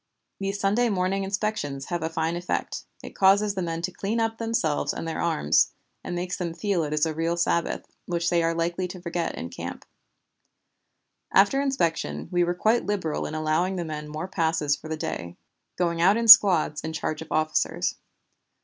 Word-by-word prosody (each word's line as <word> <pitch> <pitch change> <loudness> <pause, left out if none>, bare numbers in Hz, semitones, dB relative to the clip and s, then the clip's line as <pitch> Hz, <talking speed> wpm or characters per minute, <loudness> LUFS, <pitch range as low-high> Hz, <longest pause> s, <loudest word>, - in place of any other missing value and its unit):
These 195 0 -3
Sunday 215 +5 +2
morning 195 0 0
inspections 195 -9 -2
have 175 -2 -2
a 160 - -1
fine 165 0 -1
effect, 175 +1 -3 0.2
it - - -8
causes 200 +2 +4
the 190 - -3
men 165 -1 -3
to 185 - -2
clean 205 +5 -2
up 225 0 -1
themselves 225 -10 0
and 165 - -5
their 160 - -3
arms, 75 - +2 0.3
and 175 - -4
makes 180 +1 -3
them 170 -3 -4
feel 200 -3 0
it 150 - -4
is 150 +1 +2
a 160 - -2
real 165 +2 -1
Sabbath, 170 0 0 0.2
which 170 -1 -1
they 170 -1 +3
are 165 0 0
likely 170 +2 -1
to 180 +1 -9
forget 170 -1 -3
in 85 - -6
camp. - - -7 1.5
"After 205 +8 +4
inspection 265 -13 -1
we 175 -1 +2
were 175 +1 0
quite 220 +6 +1
liberal 190 -7 -2
in 155 - -6
allowing 155 +4 0
the 175 -2 -3
men 150 -1 -5
more 155 +4 -5
passes 160 -5 0
for 150 - -11
the 160 0 -3
day, 85 - -5 0.4
going 170 -2 0
out 195 +5 +5
in 230 0 -1
squads 185 -9 +8
in 160 - -5
charge 155 0 -3
of 160 - -10
officers. 155 0 0
175 Hz, 190 wpm, -25 LUFS, 160-195 Hz, 1.5 s, squads